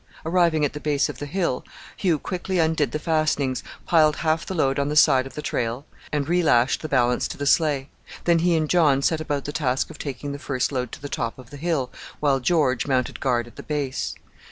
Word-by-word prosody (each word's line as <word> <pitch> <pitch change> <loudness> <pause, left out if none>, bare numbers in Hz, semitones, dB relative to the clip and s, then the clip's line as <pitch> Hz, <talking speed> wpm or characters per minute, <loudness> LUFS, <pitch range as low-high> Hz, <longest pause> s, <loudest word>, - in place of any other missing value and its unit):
Arriving 165 -3 +3
at 145 - -2
the 150 - -5
base 150 -1 +1
of 135 -3 -7
the 145 - -5
hill, 170 -6 -1 0.3
Hugh 175 -5 +1
quickly 185 +4 -3
undid 160 -3 +2
the - - -1
fastenings, 150 -4 0 0.2
piled 155 -3 +4
half 160 0 0
the 190 - -3
load 135 -4 +1
on 140 +1 0
the 150 - -2
side 135 -3 +5
of - - -13
the 150 - -5
trail, 120 +4 -2 0.3
and 145 -2 -1
relashed 155 -8 +3
the 155 - -5
balance 125 -3 +2
to - - -7
the 145 - -3
sleigh; 145 -3 +2 0.4
then 170 -1 +3
he 175 0 +3
and 155 -1 +1
John 145 -5 +3
set 160 +1 +1
about 145 -3 -2
the 145 - -3
task 135 -4 -1
of - - -13
taking 140 0 -5
the 140 - -6
first 135 -2 -1
load 125 -3 -2
to - - -7
the - - -3
top 120 -4 -3
of 130 -3 -14
the - - -9
hill, 150 -5 -1 0.3
while 140 -2 +2
George 130 -3 +1
mounted 130 -3 0
guard 120 -3 +1
at 120 - -16
the - - -6
base. 145 -4 -3
145 Hz, 225 wpm, -24 LUFS, 130-160 Hz, 0.4 s, side